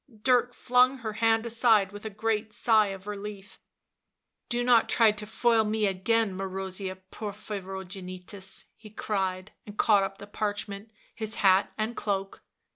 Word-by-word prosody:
Dirk 245 -1 +3
flung 250 +2 +3
her 220 -4 -5
hand 225 +1 +2
aside 225 -4 +3
with 205 +1 -10
a - - -2
great 215 +1 -2
sigh 215 -1 +4
of 195 -1 -7
relief. 205 -1 -7 0.5
" - - -55
Do 240 0 0
not 240 -2 +4
try 225 -2 +5
to 210 0 -6
foil 230 0 +3
me 215 0 0
again, 200 +2 +1
Marozia 190 0 -4 0.2
Porphyro 200 -2 -6
genitus," 185 +1 -5
he 215 - -13
cried, 190 -2 -2 0.2
and 205 0 -10
caught 210 -3 +5
up 195 0 -3
the - - -9
parchment, 205 0 -4 0.2
his 220 -1 -4
hat 190 +1 +5
and 220 +2 -2
cloak. 195 -2 -3
210 Hz, 155 wpm, -28 LUFS, 195-225 Hz, 0.5 s, try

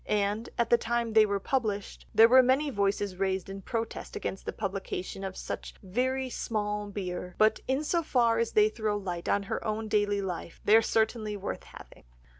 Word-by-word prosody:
And 210 +2 0
at 235 -1 0
the 235 - +6
time 235 -1 -1
they 215 -1 +6
were 200 -1 0
published 210 -4 -2
there 225 - +7
were 260 +2 +8
many 265 +4 +2
voices 200 -3 0
raised 190 0 -1
in 195 0 -7
protest 225 +2 -4
against 190 - -5
the - - 0
publication 195 -1 -4
of 190 -1 -5
such - - -6
very 260 +7 -1
"small 210 -4 -2
beer," 180 -2 -5
but 215 0 +4
in 265 +3 +1
so 335 +2 +1
far 235 -7 +2
as 230 - 0
they 210 0 +6
throw 215 -1 -1
light 180 -4 -4
on 200 - +2
her 195 - -4
own 220 0 -2
daily 205 -1 +1
life 175 -2 -5
they 210 - +6
are 225 - +7
certainly 220 -1 0
worth 200 - -5
having. - - -14
210 Hz, 195 wpm, -29 LUFS, 195-230 Hz, -, were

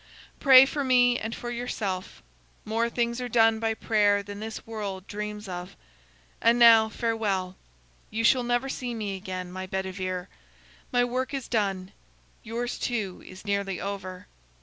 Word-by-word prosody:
Pray 265 -2 +9
for 285 +1 -2
me 245 -2 +4
and 225 +1 -4
for 240 - -6
yourself. 200 - -4 0.4
More 225 +2 0
things 235 +1 -1
are 250 - -4
done 225 -1 +4
by 225 0 0
prayer 205 -2 +2
than 205 0 -8
this 220 +1 -6
world 200 -4 -5
dreams 210 0 -6
of. 180 +1 -7 0.7
And 230 +1 +4
now, 225 -2 +7
farewell! 210 -5 -1 0.5
You 225 +1 -2
shall 250 +2 +5
never 245 +2 0
see 250 -3 -4
me 205 -3 -3
again, 185 -2 -6
my 185 +1 -6
Bedivere. 185 -1 -3 0.6
My 245 -2 +3
work 255 +3 -2
is 270 -3 -5
done; 195 -5 -1 0.5
yours, 240 +2 -4
too, 210 -7 -2
is 185 +2 -12
nearly 200 -2 -1
over. 185 -1 -6
220 Hz, 150 wpm, -27 LUFS, 190-240 Hz, 0.7 s, Pray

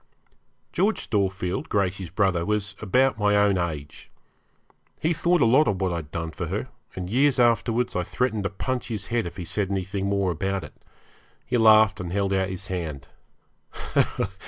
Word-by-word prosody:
George 205 +5 0
Storefield, 95 -3 -1
Gracey's 95 -3 -1
brother, 95 -2 +1
was 105 +1 -2
about 125 +3 +2
my 105 0 +3
own 100 -2 +3
age. 75 -4 -5 0.9
He 160 +3 +1
thought 170 +1 +2
a - - +5
lot 130 +7 +5
of 95 -3 0
what 95 -2 0
I'd 80 -4 -5
done 80 +1 -4
for - - -5
her, - - -3 0.3
and 90 -1 -4
years 135 +6 +2
afterwards 120 0 +2
I 90 - +1
threatened 110 +2 -1
to - - +1
punch 125 +5 -3
his 105 -5 -4
head 115 -6 +1
if 85 - -9
he 90 - -5
said 100 +2 -2
anything 100 0 -2
more 100 -2 +1
about 95 +4 -2
it. - - -10 0.7
He 125 - -2
laughed, 110 -2 +6
and 85 -1 -5
held 100 0 0
out 95 0 +1
his 95 0 -6
hand. 80 -7 -5
100 Hz, 175 wpm, -25 LUFS, 90-115 Hz, 0.9 s, laughed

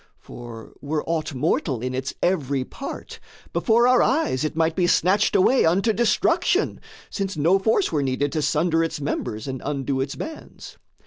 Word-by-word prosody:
For, 120 -2 -11
were 150 +1 -2
aught 160 -3 -2
mortal 135 -1 0
in 130 0 -2
its 130 +1 -3
every 140 -7 0
part, 270 - -8 0.3
Before 235 0 +3
our 255 0 +5
eyes 260 - +1
it 155 +1 -2
might 160 0 +1
be 180 -2 +2
snatched 190 +5 +2
away 255 +8 +4
Unto 195 +7 +2
destruction; 235 0 +1 0.3
since 195 -4 -3
no 170 +6 +3
force 220 - +1
were 150 - 0
needed 135 +1 -1
To 155 - -1
sunder 165 +3 +1
its 165 - -3
members 110 -5 -4
and 130 -1 -5
undo 135 -2 -2
its 135 +1 -3
bands. 315 0 -9
160 Hz, 170 wpm, -23 LUFS, 135-195 Hz, 0.3 s, our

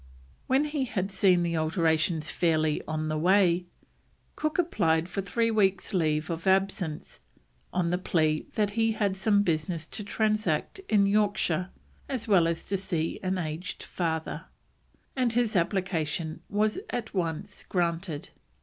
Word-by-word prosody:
When 265 +3 +3
he 295 -3 -1
had 195 -4 -2
seen 185 -2 +4
the 170 -1 -1
alterations 160 -1 +1
fairly 155 -3 +1
on 155 0 -2
the 155 0 -1
way, 180 0 +3 0.7
Cook 310 0 -1
applied 170 - +2
for 195 +2 -3
three 230 +5 0
weeks' 195 -3 +1
leave 155 -2 +1
of 165 +3 -4
absence, 190 -4 0 0.5
on 175 -2 0
the 180 - +1
plea 155 -4 +1
that 210 -2 +1
he 225 +1 +1
had 205 -3 0
"some 205 +1 +3
business 165 -1 -1
to 210 - -6
transact 215 - 0
in 205 -2 +4
Yorkshire, 200 -4 +1 0.4
as 255 -5 -3
well 185 -6 +5
as 165 0 -2
to 195 - -1
see 170 -4 -2
an 185 0 -1
aged 165 +1 -4
father," 165 -1 -3 0.7
and 250 -3 +1
his 235 -2 +1
application 170 -3 -1
was 210 - +1
at 230 -2 -4
once 180 +2 -3
granted. 170 -3 -1
185 Hz, 145 wpm, -28 LUFS, 160-205 Hz, 0.7 s, well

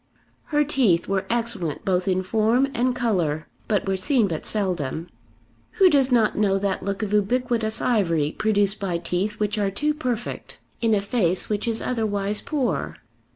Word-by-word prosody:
Her 295 -1 +2
teeth 245 - +2
were 195 -1 -1
excellent 230 -10 -2
both 185 0 +1
in 185 0 +1
form 225 +7 +2
and 250 -1 +1
colour, 175 - 0 0.2
but 205 -3 0
were 195 - +1
seen 230 +3 +2
but 160 -4 -5
seldom. 175 -6 -2 0.6
Who 380 -3 +5
does 270 -2 +3
not 230 -3 +3
know 200 -2 +2
that 195 -1 -1
look 200 +2 -3
of 210 -1 -3
ubiquitous 220 +1 +1
ivory 170 -11 +1
produced 205 0 +1
by 185 -4 -1
teeth 180 +5 -2
which 210 0 0
are 200 -1 +1
too 295 +10 0
perfect 250 -6 -4 0.2
in 225 -2 +3
a 200 - +1
face 200 -4 0
which 210 +1 -1
is 225 -1 -1
otherwise 210 -4 -1
poor? 280 -5 -2
210 Hz, 165 wpm, -24 LUFS, 190-240 Hz, 0.6 s, Who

